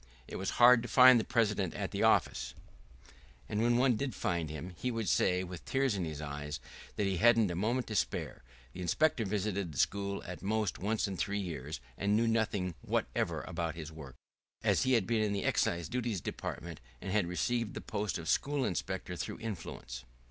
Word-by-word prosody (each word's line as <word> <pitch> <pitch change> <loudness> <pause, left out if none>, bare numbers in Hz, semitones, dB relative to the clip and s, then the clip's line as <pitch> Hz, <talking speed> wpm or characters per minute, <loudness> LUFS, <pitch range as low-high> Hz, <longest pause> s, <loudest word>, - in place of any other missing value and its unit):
It - - -6
was 95 - -2
hard 120 0 +8
to 120 - -5
find 130 -1 +8
the - - 0
president 105 -7 +1
at - - -3
the - - -2
office, - - +2 0.9
and 105 - -1
when 120 +1 +3
one 125 -2 +3
did 135 +2 -3
find 85 -4 -1
him 80 +4 -6
he 125 - -2
would 115 -3 -2
say 90 +2 +2
with 90 -2 -8
tears 135 -2 +1
in 95 -4 -1
his 80 -2 -5
eyes 75 -1 -5 0.4
that 105 - 0
he 95 -2 0
hadn't 115 0 +5
a - - -3
moment 115 +7 0
to 110 - -5
spare; - - -1 0.3
the 90 - -7
inspector 120 - +2
visited 100 -3 -1
the 70 - -9
school 100 +6 0
at 90 0 -7
most 105 0 -1
once 105 +3 0
in 95 -2 -4
three 100 +3 -1
years, 80 -6 -5 0.2
and 100 +1 +2
knew 115 +1 +3
nothing 105 -5 0
whatever - - -1
about 85 -1 -3
his 80 -1 -7
work, 70 -5 -10 0.5
as - - +3
he 130 - +2
had 115 -6 +3
been 115 -2 +1
in 105 -1 +1
the 100 - -1
Excise 85 -1 +1
Duties 120 -5 -2
Department, 85 -1 -6 0.2
and 95 - -5
had 100 -3 +2
received 110 +7 -1
the - - -3
post 105 -1 -2
of 80 -1 -7
school 140 -2 +1
inspector 90 0 -3
through - - -4
influence. 80 - -6
100 Hz, 200 wpm, -32 LUFS, 85-115 Hz, 0.9 s, hard